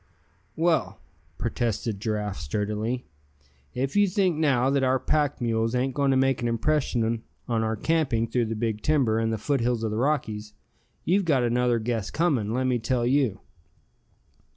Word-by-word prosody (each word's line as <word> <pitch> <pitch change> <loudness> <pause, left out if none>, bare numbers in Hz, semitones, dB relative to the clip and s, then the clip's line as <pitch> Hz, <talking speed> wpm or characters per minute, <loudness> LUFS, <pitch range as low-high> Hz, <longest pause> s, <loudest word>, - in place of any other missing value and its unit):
"Well," 160 - +1 0.4
protested 115 -3 -2
Giraffe, 105 -2 -2
sturdily, 105 - -2 0.7
"if 135 +5 -2
you 205 0 +5
think 185 -2 +1
now, 135 -4 +2
that 140 -1 +2
our 130 0 +3
pack 145 +2 0
mules 115 -1 0
ain't 130 +1 0
going 140 0 +1
to 135 - +3
make 135 -2 +2
an 120 - 0
impression 115 -2 0 0.3
on 115 -2 0
our 110 0 0
camping 130 -3 +1
through 115 +1 0
the 110 0 -3
big 110 -1 -2
timber, 130 -8 +2
and 115 0 0
the 110 - -1
foothills 120 -1 0
of 110 - -1
the 105 - -2
Rockies, 110 -6 -1 0.5
you've 190 +2 +2
got 140 -6 +2
another 120 0 +2
guess 115 -2 -2
coming, 140 -11 0
let 130 +3 0
me 125 -1 +1
tell 120 +1 0
you." 125 -5 +1
120 Hz, 165 wpm, -26 LUFS, 110-140 Hz, 0.7 s, you